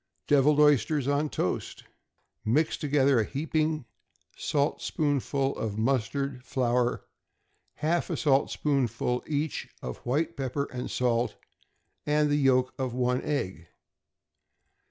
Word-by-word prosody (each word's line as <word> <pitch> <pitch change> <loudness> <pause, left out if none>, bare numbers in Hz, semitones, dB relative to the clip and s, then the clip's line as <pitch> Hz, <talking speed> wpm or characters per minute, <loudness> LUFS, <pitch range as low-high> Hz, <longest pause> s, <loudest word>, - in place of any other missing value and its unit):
=Deviled 145 +1 +4
Oysters 145 -1 +4
on 145 +2 +1
Toast.= 90 - -3 0.6
Mix 145 +9 +2
together 140 -4 +2
a - - +3
heaping 155 +2 -1 0.5
saltspoonful 140 -1 0
of 105 -2 -3
mustard 130 +2 -1
flour, 125 -1 0 0.7
half 170 +3 0
a - - -1
saltspoonful 135 -4 +1
each 150 0 -2
of 65 - -5
white 155 +7 -1
pepper 135 +1 -2
and 125 0 -4
salt, 120 -1 0 0.7
and 150 0 +2
the 145 - +3
yolk 130 -2 +3
of 130 -2 -2
one 125 0 +1
egg. 95 - -3
135 Hz, 110 wpm, -28 LUFS, 125-150 Hz, 0.7 s, =Deviled